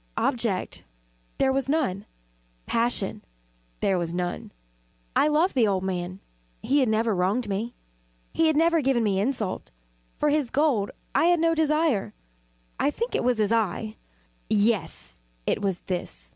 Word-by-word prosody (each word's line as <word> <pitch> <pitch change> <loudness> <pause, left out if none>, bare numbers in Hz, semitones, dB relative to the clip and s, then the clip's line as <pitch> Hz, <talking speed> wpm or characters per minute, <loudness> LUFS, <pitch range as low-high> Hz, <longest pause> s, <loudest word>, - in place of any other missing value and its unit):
Object 230 -8 -1 0.6
there 265 -1 +2
was 270 0 -1
none. 250 -10 0 0.6
Passion 230 - -1 0.6
there 190 -2 +2
was 170 0 -2
none. 175 0 -3 0.6
I - - +4
loved 310 +5 +2
the 240 -5 +3
old 190 -2 0
man. 185 0 -3 0.4
He 280 +4 +3
had 260 -4 +3
never 220 0 +2
wronged 200 +6 0
me. 210 +4 -3 0.6
He 325 - +3
had 315 -2 +2
never 330 0 +4
given 260 -4 +2
me 200 -3 +1
insult. 210 - -2 0.5
For 300 - +2
his 290 -4 +1
gold 260 -7 +2 0.2
I - - +3
had 350 0 +4
no 330 0 +3
desire. 305 - +1 0.6
I - - +3
think 470 +11 -3
it - - 0
was 245 -1 +2
his 215 -1 +1
eye! 215 0 0 0.5
yes, 210 - 0 0.2
it - - 0
was 195 -3 -1
this! 175 - -5
230 Hz, 150 wpm, -26 LUFS, 195-290 Hz, 0.6 s, I